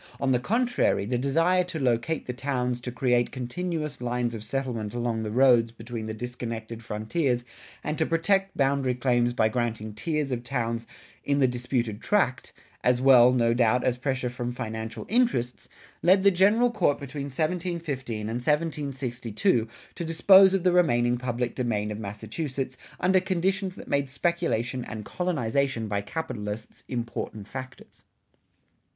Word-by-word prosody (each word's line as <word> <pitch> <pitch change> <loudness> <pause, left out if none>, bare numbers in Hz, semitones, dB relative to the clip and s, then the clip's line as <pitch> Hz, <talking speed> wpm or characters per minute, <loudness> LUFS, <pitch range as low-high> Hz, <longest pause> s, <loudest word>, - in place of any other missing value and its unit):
On 135 - +1
the 125 - +3
contrary, 230 - +1
the 120 +3 -1
desire 165 +7 +2
to 180 -2 -5
locate 130 +3 0
towns 125 -2 -1
to 125 - -5
create 120 0 +1
continuous 150 +2 -4
lines 120 -1 -1
of 110 -2 -6
settlement 120 -3 -3
along 120 -2 -1
the 110 - -3
roads 120 -1 +4
between 115 -1 -7
the 110 - -3
disconnected 115 -1 -6
frontiers 120 +4 -1 0.4
and 150 0 -3
to 160 - +2
protect 195 +4 +1
boundary 135 -2 +2
claims 120 -1 +2
by 110 -3 +3
granting 110 -2 -2
tiers 150 +5 -2
of 120 -1 -2
towns 115 -2 -2 0.4
in 140 0 +1
the 135 -2 +4
disputed 120 -3 -2
tract, 195 -11 +1 0.3
as 125 0 +3
well, 125 -2 +7
no 115 -2 +3
doubt, 120 +1 +3
as 125 - +2
pressure 130 0 -2
from 120 -1 -4
financial 110 -2 -5
interests, 215 - 0 0.3
led 190 +2 +5
the 200 - +6
General 210 +7 +4
Court 180 -10 +1
between 140 0 -5
1715 155 -5 -2
and 105 - -4
1762 135 - 0 0.3
to - - -5
dispose 190 +4 +6
of 190 - -1
the 180 - +4
remaining 120 -9 +3
public 120 -1 -2
domain 105 -4 -1
of 105 - -5
Massachusetts 130 +6 -4 0.2
under 185 +1 +4
conditions 190 +1 -1
that - - -11
made 140 -1 0
speculation 135 -5 -1
and 105 -2 -7
colonization 140 -8 -1
by 100 -1 -1
capitalists 105 -4 -5
important 115 -4 -4
factors. 130 +1 -9
125 Hz, 150 wpm, -27 LUFS, 115-160 Hz, 0.4 s, well